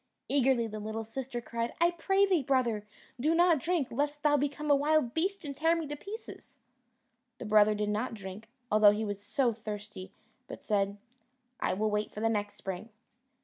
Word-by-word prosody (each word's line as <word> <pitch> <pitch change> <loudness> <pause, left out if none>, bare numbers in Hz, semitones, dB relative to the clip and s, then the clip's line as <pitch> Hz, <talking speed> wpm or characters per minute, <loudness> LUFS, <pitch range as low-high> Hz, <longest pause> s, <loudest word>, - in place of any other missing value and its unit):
Eagerly 265 -4 +3
the 215 -1 -6
little 220 +1 -4
sister 245 +2 -5
cried, 235 0 -4
"I 340 +1 +4
pray 385 +3 +2
thee, 370 -5 +2
brother, 240 -6 0 0.3
do 310 +6 +2
not 345 -2 +5
drink, 330 -2 0
lest 290 +4 -2
thou 295 -1 +4
become 290 +1 -1
a - - +7
wild 290 -3 +2
beast 375 +2 -1
and 280 -1 -5
tear 325 +3 +3
me 330 -1 -2
to 295 0 -5
pieces." 410 +9 -10 0.8
The - - -7
brother 210 0 +5
did 210 0 -1
not 220 +3 -2
drink, 200 +1 -9 0.2
although 210 0 +7
he 210 +2 0
was 205 -1 -4
so 235 +4 +1
thirsty, 210 -3 -7 0.4
but - - -9
said, 200 -1 0 0.6
"I - - 0
will 215 +2 0
wait 210 0 -1
for - - -7
the 225 +1 +1
next 205 -2 -2
spring." 190 +4 -6
235 Hz, 190 wpm, -30 LUFS, 210-295 Hz, 0.8 s, a